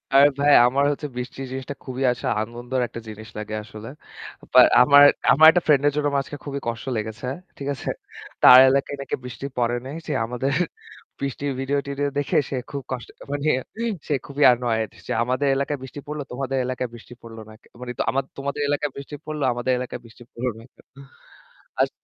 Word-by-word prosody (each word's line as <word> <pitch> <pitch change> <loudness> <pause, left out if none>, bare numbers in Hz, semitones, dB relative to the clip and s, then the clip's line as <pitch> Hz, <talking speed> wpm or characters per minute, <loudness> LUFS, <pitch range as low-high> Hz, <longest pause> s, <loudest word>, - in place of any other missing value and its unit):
আরে 140 +1 +8
ভাই 145 0 +5
আমার 135 +3 +1
হচ্ছে 145 +1 -4
বৃষ্টি 125 +2 -6
জিনিসটা 130 +1 -5
খুবই 130 0 -4
আসলে 120 - -4 0.2
আনন্দর 120 +3 -4
একটা 115 - -8
জিনিস 110 +1 -10
লাগে 110 0 -5
আসলে। 110 0 -10 0.6
বা - - +8 0.2
আমার 145 +2 +7 0.3
আমার 155 +3 +8
একটা 180 0 +1
ফ্রেন্ডের 145 -1 +4
জন্য 150 - 0
আমার 140 -1 +1
আজকে 145 - -8
খুবই 140 -1 -4
কষ্ট 115 +2 -4
লেগেছে। 110 +3 -5 0.3
ঠিক 140 - -6
আছে? - - -6 0.5
তার 125 - +11
এলাকায় 140 +1 0
নাকি 140 - -3
বৃষ্টি 125 +2 -7
পড়ে 120 0 +1
নাই। 140 +4 -6
সে 150 - -1
আমাদের 125 +4 -2 0.7
বৃষ্টির 140 +1 -3
ভিডিও-টিডিও 140 +1 -1
দেখে 145 - 0
সে - - -3 0.2
খুব 140 -1 -4
কষ্ট 125 -2 -4 0.2
মানে 145 +1 0 0.6
সে 150 - 0
খুবই 140 +1 -1
annoyed 115 -3 -1 0.2
যে - - -1
"আমাদের 130 +4 0
এলাকায় 140 +1 -2
বৃষ্টি 130 +2 -8
পড়ল, 150 +1 -5
তোমাদের 135 +1 -3
এলাকায় 125 -1 -3
বৃষ্টি 120 +1 -12
পড়ল 115 -1 -11
না।" - - -12
ক - - -68 0.2
মানে 125 - -5 0.2
আমা 135 - +1 0.2
"তোমাদের 140 +1 -3
এলাকায় 145 0 -1
বৃষ্টি 140 +1 -8
পড়ল 155 -1 -5
আমাদের 120 +2 -1
এলাকায় 125 -1 -6
বৃষ্টি 115 +1 -15
পড়লো 125 +1 -3
না 115 - -13
কেন?" - - -22 1.0
আস - - +3
135 Hz, 185 wpm, -23 LUFS, 120-140 Hz, 1.0 s, তার